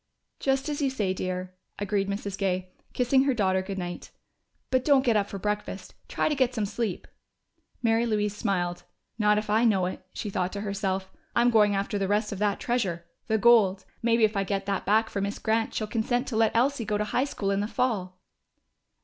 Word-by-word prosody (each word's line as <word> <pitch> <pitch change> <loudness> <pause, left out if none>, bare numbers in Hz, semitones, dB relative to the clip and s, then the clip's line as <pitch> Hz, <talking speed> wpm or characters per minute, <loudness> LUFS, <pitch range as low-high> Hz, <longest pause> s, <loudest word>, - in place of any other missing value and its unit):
"Just 270 +1 0
as 295 -1 -2
you 275 - +2
say, 210 -8 -1
dear," 185 0 -4 0.2
agreed 200 -1 -1
Mrs. 200 -1 -3
Gay, 185 -2 -1 0.2
kissing 260 +2 +3
her 270 -2 +2
daughter 190 -4 +2
good 195 +1 -5
night. 175 -1 -5 0.6
"But 255 -1 +2
don't 275 -2 +4
get 235 -3 +3
up 205 -1 +1
for 200 - -5
breakfast. 210 -1 -4
Try - - 0
to 305 - +1
get 260 -3 +1
some 215 -3 0
sleep!" 210 -1 -3 0.8
Mary 230 +1 +3
Louise 210 -2 0
smiled. 175 -5 -1 0.4
("Not 210 0 +4
if 210 0 -2
I 215 +3 +3
know 200 -6 +3
it," 185 - -5
she 210 - -5
thought 185 -1 -1
to 200 - -4
herself. 195 -2 -2 0.2
"I'm 240 +1 +4
going 210 -3 +4
after 200 +1 -1
the 195 - 0
rest 210 +2 +1
of 200 - -5
that 205 -1 +1
treasure! 190 -9 -1 0.2
The 220 - +2
gold! 215 -4 +4 0.2
Maybe 230 -1 +3
if 215 0 +3
I 195 - +1
get 195 0 -2
that 195 -2 -2
back 220 +2 +4
for 200 - -3
Miss 200 +1 -2
Grant, 225 0 0
she'll 215 - -1
consent 245 +4 -1
to 235 - -4
let 225 0 +2
Elsie 255 +1 +2
go 210 -1 -1
to 210 - 0
high 245 +5 +1
school 200 -8 -2
in 195 - +1
the 205 - -1
fall.") 190 -7 -2
210 Hz, 210 wpm, -27 LUFS, 195-230 Hz, 0.8 s, don't